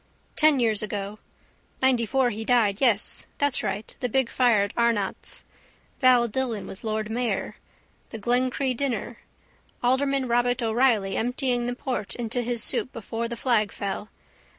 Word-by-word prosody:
Ten 305 -3 +5
years 220 -3 +2
ago: 210 0 -4 0.6
ninetyfour 255 0 +3
he 220 +2 -4
died 220 -4 +2
yes 230 -6 +1
that's 285 -2 +1
right 210 +2 -4
the 250 - -1
big 260 0 +1
fire 240 -5 +4
at 200 - -4
Arnott's. 230 -5 0 0.6
Val 250 -3 +5
Dillon 235 -2 -2
was 190 - -8
lord 215 0 -2
mayor. 230 -4 -2 0.5
The 225 - -6
Glencree 250 +3 0
dinner. 240 -3 -3 0.6
Alderman 265 +1 +2
Robert 245 +1 +1
O'Reilly 225 -4 +2
emptying 245 0 0
the 245 - -2
port 250 -6 -3
into 240 +1 -2
his 240 -1 -1
soup 255 - -1
before 230 +1 -4
the 235 0 -5
flag 225 -5 +1
fell. 200 +1 -4
235 Hz, 145 wpm, -26 LUFS, 215-255 Hz, 0.6 s, Ten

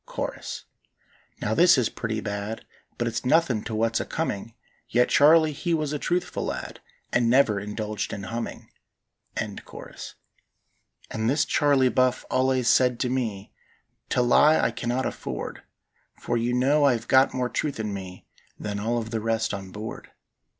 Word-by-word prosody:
Chorus. - - -5 0.8
Now 105 - 0
this 175 +4 +6
is 125 -4 +2
pretty 110 -1 -4
bad, 105 +2 -4 0.3
But 120 - -1
it's 115 - -2
nothin' 130 -5 +2
to 110 -1 -4
what's 115 +1 +1
a - - -3
coming: 115 -8 -3 0.3
Yet 125 0 +3
Charley 155 +2 +6
he 170 +3 -1
was 150 -2 -2
a 150 - -2
truthful 180 +3 -1
lad, - - -5 0.3
And 120 -1 +3
never 120 -5 +4
indulged 105 +1 -4
in 100 - -5
humming. 115 +3 -6 0.7
And - - -4 1.7
this 145 +3 +2
Charley 140 -3 +3
Buff 130 0 +1
allays 130 -1 +2
said 125 -2 +4
to 125 - +1
me: 115 -6 -3 0.6
"To 125 - +2
lie 150 +6 +5
I - - +2
cannot 120 +2 -2
afford, - - -5 0.6
For 120 - -2
you 120 +1 0
know 140 +4 +3
I 140 -3 +5
hev 115 0 -4
got 130 +1 +4
more 125 -1 0
truth 140 +1 -3
in 105 -2 -2
me 95 -2 -8 0.3
Than 105 -1 -4
all 115 +3 -1
of 110 -1 -4
the 110 -2 -2
rest 115 0 0
on 95 -1 -6
board. 110 +2 -7
120 Hz, 160 wpm, -25 LUFS, 110-135 Hz, 1.7 s, this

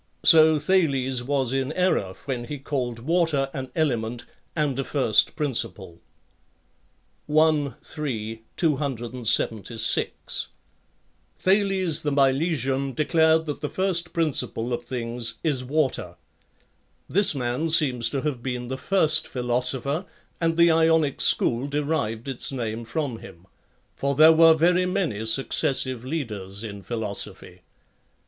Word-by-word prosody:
So 160 -1 +7
Thales 140 -6 +1
was 135 -1 -1
in 135 +1 -1
error 170 - 0
when 125 -4 -3
he 145 +4 -6
called 130 -4 -3
water 150 0 0
an 130 -1 -5
element 120 -7 -1 0.3
and 145 -4 -1
a - - 0
first 130 -7 +2
principle. 110 - -3 1.3
i.3; 145 -6 0 0.2
276. 120 - -1 0.9
Thales 190 -4 +1
the 145 - -1
Milesian 135 -1 +1
declared 160 +2 +3
that 150 -2 -5
the 150 - -3
first 180 -2 -1
principle 125 -7 -1
of 120 0 -4
things 120 -1 -4
is 140 -6 0
water. 130 - -1 0.9
[This 195 -4 +2
man 125 +5 -1
seems 130 -8 +2
to 135 - -2
have 145 -5 -3
been 125 -1 -4
the 130 0 -4
first 175 0 +2
philo 125 -1 -1
sopher, 140 +7 -1 0.3
and 165 -1 0
the 170 0 +6
Ionic 160 -3 +2
school 120 +4 +3
derived 140 -6 -2
its 135 0 -3
name 115 -3 -4
from 120 0 -3
him; 85 +2 -13 0.5
for 140 0 -1
there 155 +3 +8
were 165 0 +7
very 180 +3 +3
many 135 - -2
successive 130 0 0
leaders 105 -9 -5
in 100 -2 -7
philosophy. 110 -2 -5
135 Hz, 120 wpm, -24 LUFS, 120-160 Hz, 1.3 s, there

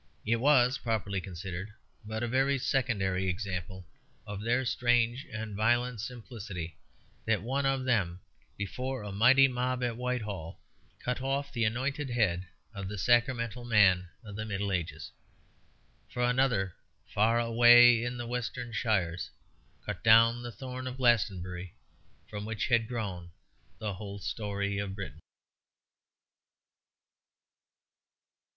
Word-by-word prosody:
It 115 +2 +2
was, 130 0 +4
properly 100 -4 -1
considered, 95 +2 -6 0.3
but 110 +2 -4
a - - 0
very 135 +3 +2
secondary 100 -8 0
example 95 0 -4 0.4
of 100 -1 -6
their 120 +4 +1
strange 120 +1 +1
and 110 -2 -5
violent 120 +2 +1
simplicity 110 -8 -7 0.5
that 105 -4 +1
one 135 +4 0
of 135 -1 0
them, 95 -8 +1 0.4
before 125 +5 -4
a 105 - -6
mighty 130 +7 +6
mob 125 0 -1
at 120 -2 -1
Whitehall, 110 -9 -4 0.4
cut 125 +1 -3
off 140 +1 -2
the 115 -3 +1
anointed 130 +5 -1
head 95 -7 +1 0.3
of 100 -3 -5
the 105 +1 -5
sacramental 120 +2 +1
man 95 -6 +4
of 105 -3 -9
the 110 - -3
Middle 100 -2 -2
Ages. 85 -4 -3 1.0
For 125 - -2
another, 120 -7 +2 0.4
far 110 +3 +3
away 120 0 +7
in 120 0 -3
the 120 - -4
western 120 0 -4
shires, 95 -6 0 0.6
cut - - -5
down 115 +2 +6
the 120 0 -6
thorn 130 +3 -6
of 130 0 -5
Glastonbury, 95 -8 0 0.5
from 105 -1 -6
which 110 0 -3
had 120 -2 +3
grown 100 -8 -4 0.5
the 105 -2 -3
whole 100 +1 -7
story 100 -1 -3
of 100 -1 -4
Britain. 95 -5 -7
115 Hz, 130 wpm, -30 LUFS, 100-125 Hz, 1.0 s, away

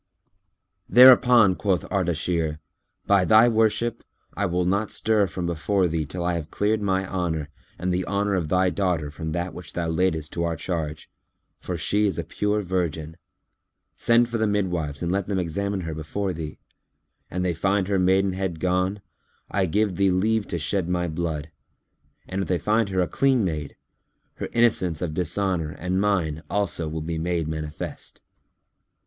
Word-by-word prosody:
Thereupon 125 -3 +7
quoth 95 -1 0
Ardashir, 85 -4 0 0.5
"By 100 -2 +4
thy 110 +4 +6
worship, 115 0 +1 0.3
I 100 +1 -1
will 90 0 0
not 100 +3 0
stir 105 -2 +1
from 90 0 -4
before 90 +3 +1
thee 80 -3 -2
till 85 +3 -5
I 90 - +1
have 80 -3 -4
cleared 105 +1 0
my 95 -1 0
honour 80 -6 -2 0.3
and 90 +1 -1
the 90 0 -1
honour 100 0 0
of 90 -5 0
thy 90 +1 +2
daughter 90 -7 -1
from 80 +2 -5
that 85 +1 -3
which 90 - -10
thou 85 -1 -2
laidest 80 -2 0
to 85 - -1
our 85 -1 -1
charge; 80 -2 -4 0.5
for 90 - -4
she 105 +5 +1
is 95 - -2
a 85 - -2
pure 105 +5 -1
virgin. 85 -4 -2 0.8
Send 120 0 +3
for 115 -1 -3
the 110 - +2
midwives 90 -8 -1
and 85 - -1
let 100 0 -1
them 100 -2 -1
examine 95 +3 -2
her 80 -2 -4
before 90 +5 -3
thee. 80 -2 -6 0.7
An 90 +1 -2
they 90 -1 +1
find 95 +3 0
her 100 -1 +1
maidenhead 95 -2 +1
gone, 90 +3 0 0.5
I 95 -2 +1
give 100 +1 0
thee 100 0 +3
leave 105 +4 +1
to 85 - -3
shed 90 +2 -1
my 90 -1 0
blood; 80 -2 -3 0.8
and 95 +1 -3
if - - -3
they 90 - +1
find 110 +2 +1
her 95 -1 +1
a 90 - +1
clean 130 -2 +2
maid, 75 -5 -4 0.6
her - - -4
innocence 105 -8 +2
of 80 -3 -3
dishonour 90 -1 -1
and 90 +3 -1
mine 85 -7 0
also 100 -5 0
will 80 0 -4
be 80 +1 -3
made 85 -1 -1
manifest." 80 -1 -6
90 Hz, 170 wpm, -24 LUFS, 80-100 Hz, 0.8 s, Thereupon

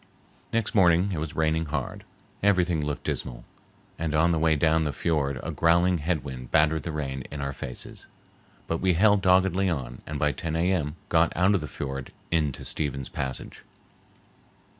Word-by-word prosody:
Next 115 -2 0
morning 90 -1 +4
it 85 - -2
was 75 -1 -5
raining 80 0 +1
hard, 75 -3 -4 0.4
everything 90 -5 +2
looked 75 -1 -3
dismal, - - -4 0.5
and 80 -1 -1
on 85 +2 +4
the 80 - +1
way 80 0 +3
down 80 +2 +3
the 75 - -1
fiord 70 -4 0
a - - -3
growling 85 +1 +3
head 80 -1 -1
wind 65 -2 -7
battered 80 0 +3
the 80 - -4
rain 70 -3 -3
in 75 - -6
our 70 0 -3
faces, 65 -3 -8 0.6
but 85 - -2
we 95 -1 +3
held 100 +2 +4
doggedly 95 +1 +3
on 65 -7 -4
and 75 - -4
by 75 +1 +2
10 80 +2 -4
A.M. 85 -3 0
got 80 0 +3
out 90 +3 +4
of 100 - +1
the 75 - -5
fiord 70 -2 -5 0.2
into 75 -5 0
Stephens 70 -3 -3
Passage. 65 -1 -5
80 Hz, 175 wpm, -26 LUFS, 70-85 Hz, 0.6 s, morning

